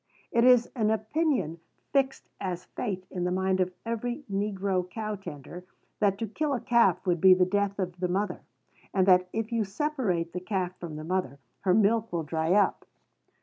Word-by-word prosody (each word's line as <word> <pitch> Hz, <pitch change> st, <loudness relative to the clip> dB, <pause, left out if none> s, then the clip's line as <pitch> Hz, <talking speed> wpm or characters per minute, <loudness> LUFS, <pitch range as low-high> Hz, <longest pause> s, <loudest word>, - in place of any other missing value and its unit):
It 235 Hz, -, +3 dB
is 250 Hz, -1 st, +6 dB
an 220 Hz, -4 st, +1 dB
opinion 220 Hz, -, 0 dB, 0.3 s
fixed 270 Hz, -1 st, +1 dB
as 180 Hz, -2 st, -4 dB
fate 190 Hz, -5 st, -4 dB
in 180 Hz, -2 st, -3 dB
the 180 Hz, -, +1 dB
mind 190 Hz, +1 st, +1 dB
of 185 Hz, 0 st, +1 dB
every 240 Hz, +4 st, -3 dB
negro 195 Hz, -2 st, -1 dB
cow 215 Hz, +2 st, -4 dB
tender, 175 Hz, -2 st, -9 dB, 0.4 s
that 200 Hz, -2 st, +2 dB
to 225 Hz, -, -3 dB
kill 285 Hz, +6 st, -1 dB
a -, -, -2 dB
calf 230 Hz, -7 st, +3 dB
would 175 Hz, -3 st, +1 dB
be 190 Hz, -1 st, +8 dB
the 180 Hz, 0 st, +3 dB
death 200 Hz, +1 st, 0 dB
of 180 Hz, -2 st, -3 dB
the 180 Hz, -, 0 dB
mother; 195 Hz, +4 st, -1 dB, 0.5 s
and 190 Hz, -1 st, +4 dB
that, 180 Hz, -1 st, +5 dB
if 225 Hz, +1 st, -3 dB
you 230 Hz, -2 st, +1 dB
separate 195 Hz, -, -1 dB
the 180 Hz, -, -2 dB
calf 185 Hz, -1 st, -2 dB
from 165 Hz, -3 st, -6 dB
the 155 Hz, -, -6 dB
mother, 165 Hz, -5 st, -2 dB, 0.2 s
her 185 Hz, -2 st, +2 dB
milk 220 Hz, +2 st, +3 dB
will 170 Hz, -2 st, -1 dB
dry 160 Hz, +2 st, 0 dB
up. 205 Hz, 0 st, +2 dB
195 Hz, 190 wpm, -28 LUFS, 180-225 Hz, 0.5 s, be